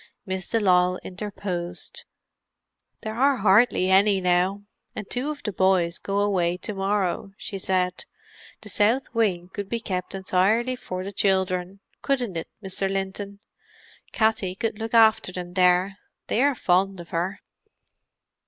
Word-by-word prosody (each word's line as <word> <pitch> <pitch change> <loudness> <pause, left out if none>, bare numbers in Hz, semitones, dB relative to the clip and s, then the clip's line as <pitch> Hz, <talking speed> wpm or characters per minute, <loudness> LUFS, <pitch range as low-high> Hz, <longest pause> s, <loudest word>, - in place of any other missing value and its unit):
Miss 190 -2 -4
de 230 - +1
Lisle 180 -2 +3
interposed. 180 -2 -5 1.0
"There 215 -1 -4
are 270 +4 +3
hardly 195 -3 +4
any 195 +1 +5
now—and 190 +3 -2
two 255 +4 -1
of 300 -1 -6
the 210 - -2
boys 185 -3 +2
go 200 0 -1
away 180 -4 +1
to 210 - -6
morrow," 195 -1 -1
she 195 - -6
said. 180 -1 -1 0.6
"The 210 - -9
south 225 +7 +1
wing 190 -6 0
could 200 -1 -5
be 235 - -1
kept 185 -4 -4
entirely 195 +7 +1
for 185 -6 -6
the 195 - -5
children, 190 -1 0 0.2
couldn't 245 -9 -1
it, 165 - -4 0.2
Mr. 190 0 -2
Linton? 195 +1 -4 0.7
Katty 215 -4 +1
could 220 +1 -3
look 225 +1 -3
after 220 -3 +5
them 180 -1 -7
there—they 185 +5 +1
are 285 0 +3
fond 190 -2 +1
of 175 - -10
her." 180 +4 -2
195 Hz, 140 wpm, -25 LUFS, 180-215 Hz, 1.0 s, any